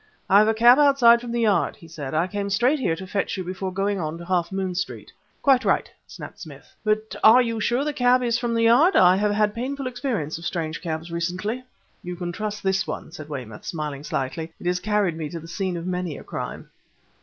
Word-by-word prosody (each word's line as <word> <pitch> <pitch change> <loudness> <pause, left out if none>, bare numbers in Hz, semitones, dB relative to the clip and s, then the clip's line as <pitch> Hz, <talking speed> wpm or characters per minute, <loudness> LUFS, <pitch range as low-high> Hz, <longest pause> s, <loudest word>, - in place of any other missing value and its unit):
"I 200 - +8
have 215 - +4
a 220 - +2
cab 240 +4 +7
outside 260 -5 +6
from 240 -1 -6
the 235 0 -1
Yard," 205 -6 +2
he 165 - -15
said. 155 -3 -6
"I 165 +3 +2
came 200 +1 -3
straight 245 +9 +2
here 170 -10 0
to 190 +3 -8
fetch 195 0 -2
you 185 - -3
before 185 +1 -4
going 195 +1 -1
on 155 -1 -3
to 170 - -9
Half 180 -1 0
Moon 190 -1 -2
Street." 180 +1 -5 0.3
"Quite 265 -2 +4
right!" - - +1 0.2
snapped - - -10
Smith; - - -12
"but 215 0 -1 0.3
you 230 -1 -2
are - - -3
sure 240 +5 +1
the 300 0 -2
cab 250 -1 +3
is 235 -1 +1
from 235 -1 -1
the 230 - +2
Yard? 255 +11 +5
I 180 0 +6
have 210 +1 +1
had 210 0 +1
painful 270 +4 -4
experience 240 - -3
of 170 - -10
strange 165 -3 -3
cabs 165 0 -4
recently!" 185 +8 -3 0.4
"You 180 0 -6
can 175 0 -4
trust 210 +3 -5
this 190 0 +1
one," - - -6
said 155 -3 -10
Weymouth, 125 -7 -7
smiling 150 -3 -5
slightly. 160 +4 -3
"It - - -11
has 180 0 +1
carried 205 -3 0
me 160 -2 -5
to 165 - -6
the 165 - -11
scene 185 0 -3
of 170 - -6
many 180 -4 -3
a - - -10
crime." - - -6
190 Hz, 235 wpm, -24 LUFS, 170-230 Hz, 0.4 s, I